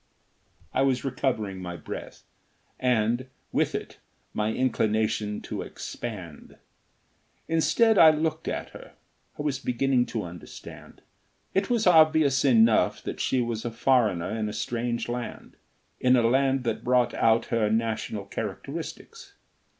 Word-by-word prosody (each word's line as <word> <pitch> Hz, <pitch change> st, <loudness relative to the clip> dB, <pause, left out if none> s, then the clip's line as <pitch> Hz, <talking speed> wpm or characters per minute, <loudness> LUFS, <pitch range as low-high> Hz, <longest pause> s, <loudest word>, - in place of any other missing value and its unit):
I 130 Hz, -, +2 dB
was 135 Hz, -1 st, +1 dB
recovering 120 Hz, -8 st, -2 dB
my 90 Hz, -1 st, -6 dB
breath, -, -, -8 dB, 0.6 s
and, 120 Hz, 0 st, +1 dB, 0.2 s
with -, -, +1 dB
it, -, -, -6 dB, 0.3 s
my 105 Hz, +1 st, 0 dB
inclination 110 Hz, -4 st, 0 dB
to -, -, -5 dB
expand. 95 Hz, -10 st, -8 dB, 0.9 s
Instead, 210 Hz, +7 st, +3 dB
I 160 Hz, -, +10 dB
looked 155 Hz, +1 st, -1 dB
at -, -, -3 dB
her. -, -, -12 dB, 0.4 s
I -, -, -4 dB
was 140 Hz, -3 st, -1 dB
beginning 125 Hz, 0 st, +1 dB
to 110 Hz, -, -3 dB
understand. 85 Hz, 0 st, -11 dB, 0.5 s
It 195 Hz, +1 st, +1 dB
was 235 Hz, -3 st, +1 dB
obvious 155 Hz, -5 st, +5 dB
enough 115 Hz, -4 st, +4 dB
that -, -, -5 dB
she 130 Hz, -, +1 dB
was 115 Hz, -2 st, -3 dB
a 120 Hz, -, -2 dB
foreigner 110 Hz, -8 st, +1 dB
in 110 Hz, -1 st, -2 dB
a -, -, -6 dB
strange 120 Hz, 0 st, -2 dB
land, 120 Hz, 0 st, -6 dB, 0.4 s
in 130 Hz, 0 st, +4 dB
a 120 Hz, -, +3 dB
land 135 Hz, +2 st, +2 dB
that 115 Hz, -3 st, -2 dB
brought 125 Hz, 0 st, +2 dB
out 115 Hz, +1 st, +3 dB
her 110 Hz, -2 st, +2 dB
national 110 Hz, -2 st, -1 dB
characteristics. -, -, -7 dB
120 Hz, 135 wpm, -26 LUFS, 110-135 Hz, 0.9 s, I